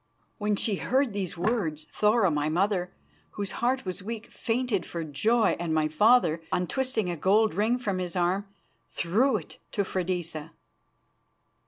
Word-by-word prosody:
When 210 0 +1
she 200 0 0
heard 260 0 +1
these 190 -4 -3
words, 175 -6 0
Thora, 210 -3 +3
my 150 0 0
mother, 180 +2 +1 0.4
whose 200 -2 -3
heart 255 +1 0
was 185 +1 -4
weak, 225 +2 -5
fainted 230 -4 -1
for 170 -1 -5
joy, 215 +9 +2
and 165 -2 -1
my 155 -1 +2
father, 170 -1 +4
untwisting 220 +1 0
a - - -3
gold 205 +7 +3
ring 215 +7 +2
from 200 -7 -2
his 180 -1 -4
arm, 185 +3 +1 0.4
threw 220 +8 +2
it 165 - -11
to 200 - +1
Freydisa. 175 -4 -3
195 Hz, 150 wpm, -27 LUFS, 175-225 Hz, 0.4 s, father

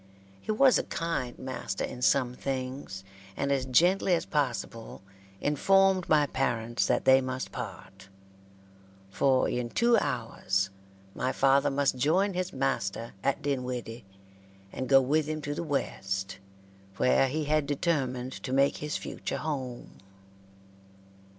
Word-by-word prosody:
He - - -3
was 255 +4 +5
a - - -1
kind 165 -7 -3
master 130 -7 -4
in 125 - -5
some 125 -1 +3
things, 130 -6 -5 0.3
and 140 - -1
as 135 -2 0
gently 175 +7 +4
as 165 - -2
possible 120 -7 -3 0.4
informed 190 +5 +3
my 150 -2 +5
parents 120 -4 -1
that - - +1
they 130 0 +6
must 130 0 -4
part; 95 0 -8 1.0
for 130 +5 +2
in 120 -1 -2
two 235 - +3
hours 100 - -1 0.4
my 130 - -1
father 135 +1 +3
must 140 -1 +1
join 180 +10 +2
his 185 +1 -2
master 115 - -2
at 140 +2 0
Dinwiddie, 125 -4 -3 0.7
and 130 - -4
go 135 -1 +8
with 150 +4 +1
him 155 0 -3
to 145 - -3
the - - -4
West, 95 - -3 0.6
where 135 +1 +3
he 155 +4 -2
had 150 -1 +1
determined 135 -5 -1
to 130 - -5
make 140 +1 +3
his 150 0 -3
future - - -5
home. 130 -5 -5
135 Hz, 135 wpm, -28 LUFS, 125-150 Hz, 1.0 s, go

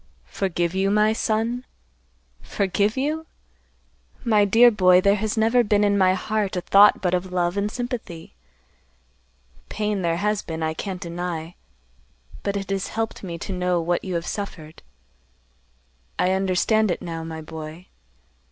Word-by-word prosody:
"Forgive 175 -3 -1
you, 190 +1 +1
my 210 +1 +3
son? 225 +3 -1 0.8
Forgive 200 +3 0
you? 310 +4 -2 1.0
My 210 -3 +4
dear 230 +4 +6
boy, 185 -4 +5
there 200 +2 +4
has 215 +2 -2
never 230 +3 +3
been 210 -1 +2
in 205 -1 +3
my 185 -1 +4
heart 210 0 -2
a 180 - -1
thought 200 +4 +5
but 180 -1 +1
of 180 0 -1
love 175 0 0
and 205 +1 0
sympathy. 240 -10 -6 1.4
Pain 210 -2 -2
there 170 -1 0
has 210 +2 0
been, 160 -1 -5
I 160 0 -1
can't 185 +2 -5
deny, 170 -2 -5 0.9
but 200 0 -2
it 195 0 -5
has 195 -1 -1
helped 225 0 -4
me 175 -3 -6
to 190 - -5
know 180 -1 0
what 170 +1 -1
you 185 -2 -4
have 170 0 -2
suffered. 165 -6 -6 1.4
I 185 - +2
understand 195 +3 +2
it 175 - -2
now, 165 -1 -5
my 160 -1 -7
boy. 160 +2 -9
195 Hz, 150 wpm, -23 LUFS, 175-210 Hz, 1.4 s, dear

